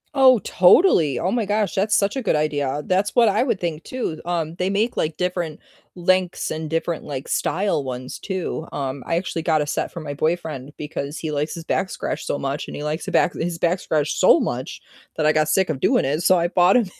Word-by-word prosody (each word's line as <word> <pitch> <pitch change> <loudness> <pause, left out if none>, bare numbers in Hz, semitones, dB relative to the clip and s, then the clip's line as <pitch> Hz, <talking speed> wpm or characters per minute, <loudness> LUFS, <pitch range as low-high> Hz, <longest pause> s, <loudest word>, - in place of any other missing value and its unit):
Oh, 260 -2 +7
totally, 180 - +4
oh 185 - -1
my 230 -3 0
gosh, 210 0 0
that's 210 +2 +1
such 200 +4 +1
a 265 - -1
good 200 - +1
idea. 145 -1 -1
That's 190 +5 0
what 235 -3 +5
I - - +2
would 245 -7 0
think 170 -2 -3
too, 230 -11 -4
um, 170 -2 -2
they 185 +1 -1
make, 215 +5 0
like, 155 0 -1
different 175 -4 -2 0.4
lengths, 185 0 0
and 155 -1 -4
different, 165 +1 -2
like, 140 -1 -6
style 190 -5 0
ones 130 -1 -6
too, 185 -4 -4
um, 135 -1 -4
I 165 - 0
actually 170 -1 -2
got 160 -2 +2
a - - 0
set - - -2
for 170 - -7
my 145 -2 -5
boyfriend 155 -3 -2
because 150 -1 -5
he 155 - -4
likes 150 +1 -2
his 165 - -7
back 190 - -1
scratched - - -4
so - - -1
much, 140 +2 -3
and - - -7
he 145 - -5
likes 150 +2 -3
his - - -4
back - - +3
his 170 0 -3
back 175 +2 +1
scratched 150 -1 -1
so - - +6
much - - -4 0.4
that 155 - 0
I 155 - +5
got 155 0 +1
sick 190 +2 +2
of 135 - -4
doing - - +2
it, 145 +4 0
so, 185 +1 +4
I 170 0 +1
bought 180 +3 +4
him 235 - +2
165 Hz, 235 wpm, -22 LUFS, 150-185 Hz, 0.4 s, Oh